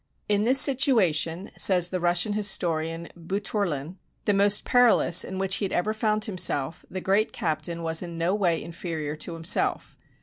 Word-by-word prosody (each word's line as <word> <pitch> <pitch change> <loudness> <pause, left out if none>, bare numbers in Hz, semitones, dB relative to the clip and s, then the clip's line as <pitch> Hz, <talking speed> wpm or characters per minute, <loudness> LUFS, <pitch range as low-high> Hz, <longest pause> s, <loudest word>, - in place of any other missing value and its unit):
"In 205 0 +1
this 260 +3 +5
situa 260 - +4
tion," 165 +6 -2
says 180 -2 +2
the 185 - -3
Russian 175 +4 +1
historian 170 -5 -1
Boutourlin, 180 -3 -3 0.3
"the 205 - +2
most 200 +1 +2
perilous 235 -8 +4
in 190 - -7
which 190 0 -1
he 205 - -2
had 190 - -5
ever 210 +5 -1
found 215 -1 0
himself, 165 -7 -1
the 185 - -5
great 200 +4 +1
captain 170 +1 -3
was 160 0 +1
in 170 -2 -7
no 170 +3 0
way 180 -5 0
inferior 165 -3 -5
to 165 +2 -6
himself. 165 0 -1
180 Hz, 170 wpm, -25 LUFS, 165-205 Hz, 0.3 s, this